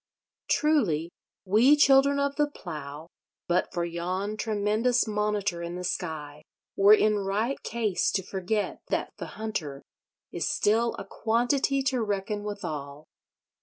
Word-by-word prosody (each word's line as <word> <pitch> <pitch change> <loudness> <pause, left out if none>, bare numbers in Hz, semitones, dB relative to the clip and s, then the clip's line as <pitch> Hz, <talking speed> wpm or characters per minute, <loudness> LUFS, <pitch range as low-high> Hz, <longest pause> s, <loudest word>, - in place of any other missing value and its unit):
Truly, 195 - +2 0.3
we 225 +9 +5
Children 280 -1 +5
of 280 0 0
the 295 0 +2
Plough, 155 - -8 0.4
but 175 +1 +1
for 175 -1 -1
yon 180 +5 -3
tremendous 215 +3 +1
Monitor 210 -4 -1
in 170 +1 -5
the 180 - -5
sky, 155 -5 -4 0.3
were 200 +2 +7
in 215 -1 +2
right 205 +7 -1
case 220 -5 0
to 190 - 0
forget 195 +3 -2
that - - -2
the - - -8
Hunter 165 -11 -4 0.5
is - - -2
still 230 +3 +1
a - - -6
quantity 245 +6 +1
to 265 -3 0
reckon 205 0 -2
withal. 155 -8 -6
205 Hz, 130 wpm, -27 LUFS, 175-235 Hz, 0.5 s, were